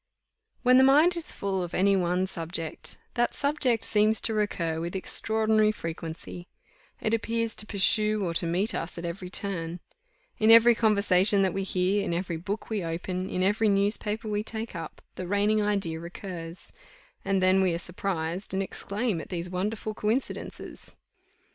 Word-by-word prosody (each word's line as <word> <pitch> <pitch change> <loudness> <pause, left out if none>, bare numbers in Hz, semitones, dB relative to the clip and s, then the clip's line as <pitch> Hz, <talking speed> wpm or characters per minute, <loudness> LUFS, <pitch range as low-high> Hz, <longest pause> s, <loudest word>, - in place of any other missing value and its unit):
When 255 +1 +6
the - - +7
mind 300 +7 +5
is 340 -2 -3
full 195 -1 -2
of 175 -1 -4
any 195 +1 +4
one 180 0 +1
subject, 165 -3 -5 0.2
that 240 0 0
subject 275 -6 +1
seems 215 +1 +3
to 225 - -1
recur 170 -6 -1
with 170 +3 -4
extraordinary 215 +2 +1
frequency 165 -1 -7 0.5
it 215 - -1
appears 230 0 0
to 210 - 0
pursue 215 0 +2
or 170 - -2
to 170 +1 0
meet 185 +6 +1
us 165 - -4
at 170 - -5
every 180 +2 -5
turn: 180 -3 -2 0.6
in 220 - +4
every 230 +1 +8
conversation 200 -3 +3
that 190 - +1
we 195 - -1
hear, 190 +1 +1
in 170 - -1
every 175 -1 -2
book 195 +6 -4
we 215 -4 -2
open, 180 +3 -3
in 185 - -1
every 210 +3 +2
newspaper 210 +2 0
we 210 -1 -1
take 220 -1 -6
up, 165 -2 -7
the 180 - -6
reigning 205 +2 +2
idea 195 -6 -1
recurs; 170 0 -7 0.5
and 195 -1 +1
then 185 +1 +4
we 185 -2 +3
are 165 - -1
surprised, 180 +1 -3
and 195 - +1
exclaim 200 -1 -2
at - - -11
these 175 -1 -4
wonderful 210 +4 -2
coincidences. 220 +5 -4
195 Hz, 165 wpm, -27 LUFS, 180-215 Hz, 0.6 s, every